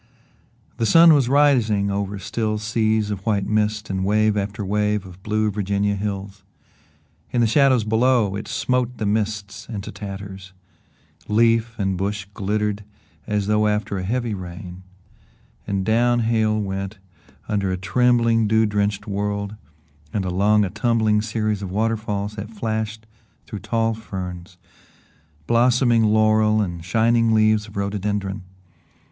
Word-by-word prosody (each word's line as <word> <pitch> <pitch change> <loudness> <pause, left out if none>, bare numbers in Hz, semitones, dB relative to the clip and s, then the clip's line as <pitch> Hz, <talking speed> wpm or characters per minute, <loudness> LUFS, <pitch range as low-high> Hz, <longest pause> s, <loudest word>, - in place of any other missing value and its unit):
The 115 - 0
sun 165 +3 +7
was 135 -5 +3
rising 120 -8 +3
over 100 0 -2
still 110 +3 -2
seas 110 0 0
of 100 -2 -5
white 100 -3 0
mist 105 0 0
and 95 -1 -2
wave 105 +2 +2
after 100 +1 -3
wave 105 0 0
of 95 0 -13
blue 110 +1 0
Virginia 100 0 0
hills. 100 -1 -5 0.9
In 120 - -1
the 120 - +4
shadows 130 0 +4
below, 110 -2 +2
it 105 - -5
smote 125 -1 -1
the 110 - -3
mists 105 0 -2
into 105 -4 -6
tatters; 95 -2 -8 0.7
leaf 115 +1 +2
and 95 -2 -1
bush 100 +1 -2
glittered 105 +1 -2 0.4
as 105 -2 0
though 105 +1 +2
after 105 -2 -1
a - - -4
heavy 115 +3 -1
rain, 90 -1 -8 0.9
and 100 -1 -1
down 120 +2 +2
Hale 110 -1 +1
went 95 0 -4 0.5
under 100 -3 -1
a 95 - -1
trembling 115 +2 +2
dew 110 +1 +3
drenched 105 -1 -1
world 100 0 -3 0.6
and 100 -3 -2
along 100 +3 +2
a 90 - -5
tumbling 110 -1 +1
series 110 -2 -2
of 95 - -5
water 110 +4 0
falls 105 -1 -4
that 105 +1 -6
flashed 110 0 -4 0.4
through 105 - -7
tall 115 +1 0
ferns, 90 -4 -7 0.9
blossoming 120 - +3
laurel 110 0 +3
and 85 -5 -3
shining 115 +4 +2
leaves 110 -1 +3
of 105 - -11
rhododendron. 100 0 -2
105 Hz, 140 wpm, -22 LUFS, 100-110 Hz, 0.9 s, sun